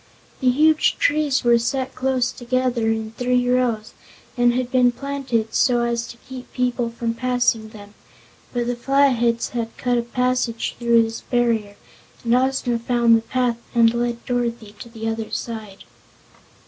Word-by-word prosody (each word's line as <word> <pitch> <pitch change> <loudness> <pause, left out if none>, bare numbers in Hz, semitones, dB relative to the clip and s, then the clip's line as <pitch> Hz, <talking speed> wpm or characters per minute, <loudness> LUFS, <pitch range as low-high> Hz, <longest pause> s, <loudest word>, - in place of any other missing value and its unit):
The 255 - +3
huge 310 +4 +3
trees 290 -3 +1
were 240 -1 +4
set 260 +2 -2
close 255 -1 0
together, 250 -2 -1
in 220 0 -1
three 245 +1 0
rows, 245 -4 0 0.4
and 245 0 +4
had 250 0 -2
been 250 -1 +4
planted 255 -4 -3
so 245 -2 +3
as 235 -1 -1
to 235 - -11
keep 255 -1 -9
people 245 -1 0
from 230 0 -3
passing 245 -2 0
them, 205 -1 -13 0.6
but 240 -1 -1
the 245 0 -1
Flatheads 240 -3 +2
had 230 -2 -4
cut 245 -1 +1
a - - +1
passage 250 -1 -1
through 235 -1 +4
this 225 0 -5
barrier 230 -4 0 0.5
and 235 -1 +1
Ozma 250 -1 +1
found 235 -1 +3
the 225 - +2
path 245 0 -1 0.2
and 230 -1 +5
led 235 0 -2
Dorothy 235 -3 -2
to 235 - -9
the 225 -1 -6
other 225 -1 -3
side. 220 -3 -6
240 Hz, 160 wpm, -22 LUFS, 230-250 Hz, 0.6 s, and